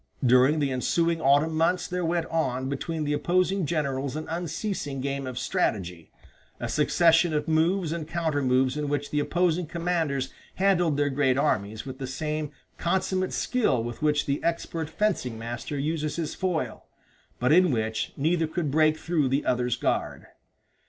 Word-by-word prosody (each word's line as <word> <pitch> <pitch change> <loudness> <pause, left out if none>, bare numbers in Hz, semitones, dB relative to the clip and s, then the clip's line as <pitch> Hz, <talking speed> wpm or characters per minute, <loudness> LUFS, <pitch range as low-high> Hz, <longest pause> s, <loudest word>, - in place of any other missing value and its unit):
During 130 +5 +5
the 140 -3 0
ensuing 165 +6 +1
autumn 145 +4 +3
months 170 +3 +1
there 180 0 -2
went 170 0 0
on 130 -5 0
between 155 +3 -3
the 145 0 0
opposing 185 +3 +1
generals 140 -4 -1
an 155 - -5
unceasing 170 -3 -3
game 140 0 -3
of 130 -1 -6
strategy, 90 -8 -2 0.5
a - - -3
succession 165 +2 +3
of 150 - -1
moves 165 +2 +2
and 165 -2 -4
counter 160 -3 -1
moves 130 0 +2
in 150 -1 -2
which 145 0 -2
the 150 - +1
opposing 175 +2 +1
commanders 165 -6 -1 0.2
handled 175 -6 +2
their 145 -1 +1
great 135 -1 +2
armies 110 -6 0
with 130 0 -7
the 135 - -4
same 150 +2 -3 0.3
consumate 185 +1 0
skill 210 - +1
with 120 0 -6
which 150 -1 +2
the 140 +1 -2
expert 165 -1 -2
fencing 160 - -1
master 120 +5 -5
uses 150 +1 -2
his 165 -3 -3
foil, 160 -11 -3 0.5
but 125 +3 +2
in 180 +2 +6
which 110 -3 -1
neither 160 +3 +1
could 155 -2 -2
break 155 +1 +3
through 160 -6 0
the 135 +3 0
other's 125 -1 +1
guard. - - -2
150 Hz, 165 wpm, -26 LUFS, 135-170 Hz, 0.5 s, in